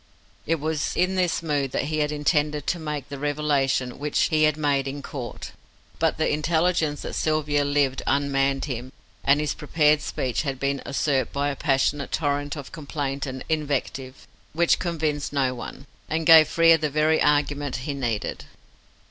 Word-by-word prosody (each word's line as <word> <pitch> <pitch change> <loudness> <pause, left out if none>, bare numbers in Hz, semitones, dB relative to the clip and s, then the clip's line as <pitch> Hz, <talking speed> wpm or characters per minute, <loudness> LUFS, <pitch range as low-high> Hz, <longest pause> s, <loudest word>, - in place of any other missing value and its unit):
It 165 +1 +1
was 155 0 -2
in 180 +1 +2
this 180 -3 0
mood 145 -4 0
that - - 0
he 155 +2 -2
had 150 0 +1
intended 150 -1 0
to 175 - -1
make 150 -4 -4
the 140 -1 -6
revelation 140 -3 0
which 150 0 -1
he 155 -1 +3
had 155 0 +1
made 140 -3 +1
in 140 +1 -5
Court, 125 -6 -7 0.5
but 165 -1 +1
the 155 - +1
intelligence 160 0 +1
that - - -5
Sylvia 150 -2 +1
lived 140 -2 +1
unmanned 135 -1 +1
him, 130 -2 -5 0.3
and 140 +2 +4
his 150 -2 -1
prepared 150 0 +2
speech 125 -4 -2
had 135 -3 -3
been 140 0 -1
usurped 140 -1 0
by 140 +1 0
a 140 - -3
passionate 140 0 0
torrent 145 -2 -1
of 140 -3 -8
complaint 140 -2 -4
and 130 0 -6
invective, 140 -4 -3 0.3
which 170 +2 +3
convinced 155 -5 -2
no 135 -3 +1
one, 130 +2 -8 0.2
and 160 +1 -1
gave 160 -2 +8
Frere 165 -1 +5
the 155 -1 0
very 155 +2 +2
argument 145 -2 +1
he 145 - -2
needed. 120 -6 -3
145 Hz, 170 wpm, -24 LUFS, 140-155 Hz, 0.5 s, gave